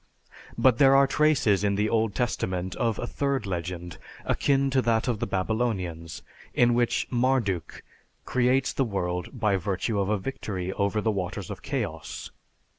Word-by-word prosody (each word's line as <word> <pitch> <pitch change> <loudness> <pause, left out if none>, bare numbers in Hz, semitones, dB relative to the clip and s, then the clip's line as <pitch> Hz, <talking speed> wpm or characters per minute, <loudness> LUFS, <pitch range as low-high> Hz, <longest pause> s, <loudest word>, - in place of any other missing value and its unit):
But 125 -3 +4
there 135 -1 +7
are 140 0 +6
traces 135 - +2
in 100 -1 +2
the 105 +2 +1
Old 110 -2 +1
Testament 95 -6 -1
of 115 -4 0
a - - -3
third 140 -2 -1
legend, 90 -2 -5 0.3
akin 140 -1 +2
to 130 0 +3
that 115 0 +1
of 120 -4 0
the 115 - -2
Babylonians, 95 -5 -2 0.3
in 120 0 +4
which 120 0 +1
Marduk 120 - 0 0.4
creates 130 +1 +2
the 135 - +1
world 95 0 -3
by 105 -3 +2
virtue 100 +3 -1
of 100 0 0
a 105 - +2
victory 95 -5 -4
over 100 +1 0
the 110 - +1
waters 95 -4 -4
of - - -7
chaos - - -4
(Tiamat). - - -37
110 Hz, 165 wpm, -27 LUFS, 95-125 Hz, 0.4 s, there